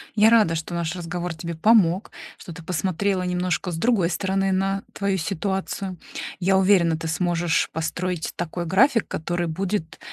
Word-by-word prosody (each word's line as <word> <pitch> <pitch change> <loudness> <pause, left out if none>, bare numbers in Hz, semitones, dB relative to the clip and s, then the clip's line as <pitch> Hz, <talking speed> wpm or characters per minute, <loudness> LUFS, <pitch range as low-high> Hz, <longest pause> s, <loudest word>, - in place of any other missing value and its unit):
Я 215 +1 +6
рада, 215 -8 +4
что 165 +2 -4
наш 170 0 -2
разговор 175 0 -4
тебе 170 +1 -6
помог, 190 0 +3 0.3
что 170 - -10
ты 170 0 -11
посмотрела 185 +2 -1
немножко 180 0 -1
с 160 - -4
другой 195 -3 +2
стороны 195 +2 0
на 195 +1 0
твою 200 -1 0
ситуацию. 190 +2 -3 0.4
Я 190 +1 +3
уверена, 185 -4 +4
ты 165 - -5
сможешь 170 +1 0
построить 175 +1 -3
такой 175 0 -4
график, 230 - +3
который 175 +2 -2
будет 180 0 -3
180 Hz, 155 wpm, -23 LUFS, 165-195 Hz, 0.4 s, Я